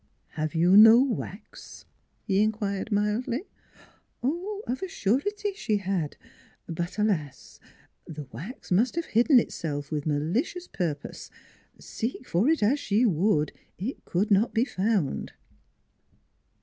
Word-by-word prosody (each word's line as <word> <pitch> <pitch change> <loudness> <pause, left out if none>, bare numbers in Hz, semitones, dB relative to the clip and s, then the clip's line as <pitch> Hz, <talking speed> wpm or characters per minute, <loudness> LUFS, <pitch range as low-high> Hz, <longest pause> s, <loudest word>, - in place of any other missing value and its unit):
" - - -44
Have 155 +1 -4
you 175 +4 +4
no 225 +3 +9
wax? 225 -5 -4 0.2
" - - -44
he 195 -2 +2
inquired 210 -1 -1
mildly. 210 - 0 0.8
Of 350 - -3
a 380 - -2
surety 395 - -1
she 235 - -1
had; 185 -6 -2 0.5
but 170 +3 -4
alas! 160 -11 -2 0.5
the 150 -2 -7
wax 210 - -9
must 225 - +2
have 335 -1 -1
hidden 245 +5 +5
itself 145 -8 -4
with 150 0 -2
malicious 190 - -1
purpose. 155 -6 -4 0.5
Seek 250 +2 -5
for 195 - +2
it 320 -8 +2
as 260 +8 +3
she 215 +1 +2
would, 165 - +2 0.3
it 215 +10 -5
could 200 +5 -1
not 205 +5 +3
be 230 +3 +3
found. 195 - -1
210 Hz, 130 wpm, -27 LUFS, 175-250 Hz, 0.8 s, no